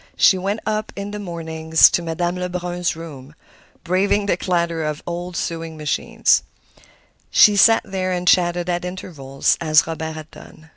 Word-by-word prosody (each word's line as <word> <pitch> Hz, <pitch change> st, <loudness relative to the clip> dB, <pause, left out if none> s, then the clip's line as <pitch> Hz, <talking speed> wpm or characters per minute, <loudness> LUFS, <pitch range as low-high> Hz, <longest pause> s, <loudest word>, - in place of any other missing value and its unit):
She 195 Hz, -, +5 dB
went 195 Hz, +4 st, -3 dB
up 215 Hz, 0 st, -2 dB
in 200 Hz, 0 st, -6 dB
the 210 Hz, -, -6 dB
mornings 160 Hz, -3 st, +2 dB
to -, -, 0 dB
Madame 175 Hz, +2 st, -2 dB
Lebrun's 180 Hz, -1 st, -3 dB
room, 150 Hz, -3 st, -11 dB, 0.5 s
braving 195 Hz, +3 st, +1 dB
the 200 Hz, -, +1 dB
clatter 170 Hz, -2 st, -1 dB
of 150 Hz, -1 st, -2 dB
the -, -, -17 dB
old 175 Hz, +1 st, -5 dB
sewing 165 Hz, -1 st, -4 dB
machine. 150 Hz, -1 st, -4 dB, 1.1 s
She 210 Hz, -, +6 dB
sat 225 Hz, +3 st, +5 dB
there 190 Hz, -2 st, -3 dB
and 180 Hz, 0 st, -3 dB
chatted 175 Hz, -1 st, +2 dB
at 175 Hz, -1 st, -2 dB
intervals 155 Hz, -7 st, -2 dB
as 155 Hz, -1 st, +4 dB
Robert 160 Hz, -1 st, -5 dB
had 155 Hz, 0 st, -10 dB
done. 160 Hz, +1 st, -15 dB
175 Hz, 160 wpm, -20 LUFS, 160-185 Hz, 1.1 s, She